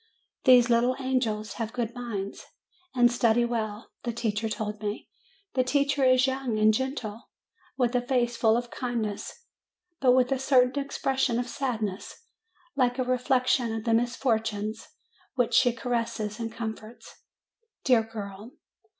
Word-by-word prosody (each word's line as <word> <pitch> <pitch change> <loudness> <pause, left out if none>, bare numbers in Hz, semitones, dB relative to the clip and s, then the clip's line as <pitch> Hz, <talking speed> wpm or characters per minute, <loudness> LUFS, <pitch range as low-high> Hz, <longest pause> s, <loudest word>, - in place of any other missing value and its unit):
These 250 -3 +7
little 240 +2 +3
angels 225 -6 -1
have 225 0 -3
good 235 -2 -2
minds, 225 -6 -5 0.5
and 240 -1 +5
study 235 0 +3
well, 220 -2 -4
the 240 - -2
teacher 225 -1 -2
told 210 -1 -4
me. 210 0 -4 0.4
The 255 - +2
teacher 280 +1 +1
is 255 0 +5
young 260 -4 -1
and 215 0 +5
gentle, 240 -3 -4 0.5
with 245 -2 +1
a 245 - +2
face 245 -2 0
full 225 -1 +3
of 240 0 -4
kindness, 240 - -4 0.5
but 255 -2 +5
with 255 0 +3
a 270 - +1
certain 265 +1 +3
expression 265 -3 0
of 245 0 -2
sadness, 225 -7 -3 0.6
like 250 -2 +2
a 255 - +1
reflection 250 -1 +1
of 220 - -4
the 230 -1 +1
misfortunes 225 -3 -1 0.5
which 245 -2 +1
she 245 +2 +5
caresses 230 -3 -3
and 230 -1 -3
comforts. 225 0 -8 0.7
Dear 250 -4 +4
girl 215 0 -8
240 Hz, 140 wpm, -27 LUFS, 220-255 Hz, 0.7 s, These